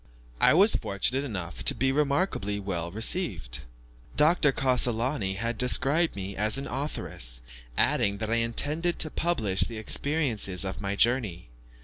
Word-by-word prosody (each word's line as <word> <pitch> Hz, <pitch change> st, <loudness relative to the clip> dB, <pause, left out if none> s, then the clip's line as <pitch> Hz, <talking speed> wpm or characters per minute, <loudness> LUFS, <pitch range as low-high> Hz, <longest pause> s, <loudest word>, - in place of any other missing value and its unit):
I -, -, +5 dB
was 200 Hz, +5 st, +5 dB
fortunate 125 Hz, +7 st, -1 dB
enough 90 Hz, -, -5 dB
to -, -, +2 dB
be 135 Hz, +2 st, +1 dB
remarkably 140 Hz, -, -1 dB
well 85 Hz, -4 st, -4 dB
received. 95 Hz, -, 0 dB, 0.6 s
Dr. 150 Hz, -1 st, +4 dB
Cassolani 125 Hz, -5 st, 0 dB
had 115 Hz, +2 st, -3 dB
described 140 Hz, +6 st, +2 dB
me 100 Hz, 0 st, -6 dB
as 105 Hz, +4 st, +1 dB
an 135 Hz, -, -4 dB
authoress, -, -, -3 dB, 0.4 s
adding 100 Hz, 0 st, +2 dB
that 110 Hz, +1 st, -3 dB
I 115 Hz, -, +2 dB
intended 150 Hz, +9 st, 0 dB
to 155 Hz, -, +2 dB
publish 110 Hz, -, -1 dB
the 115 Hz, -, +1 dB
experiences 110 Hz, -, 0 dB
of 95 Hz, 0 st, -5 dB
my 100 Hz, 0 st, -3 dB
journey. 105 Hz, -, 0 dB
115 Hz, 140 wpm, -27 LUFS, 100-145 Hz, 0.6 s, I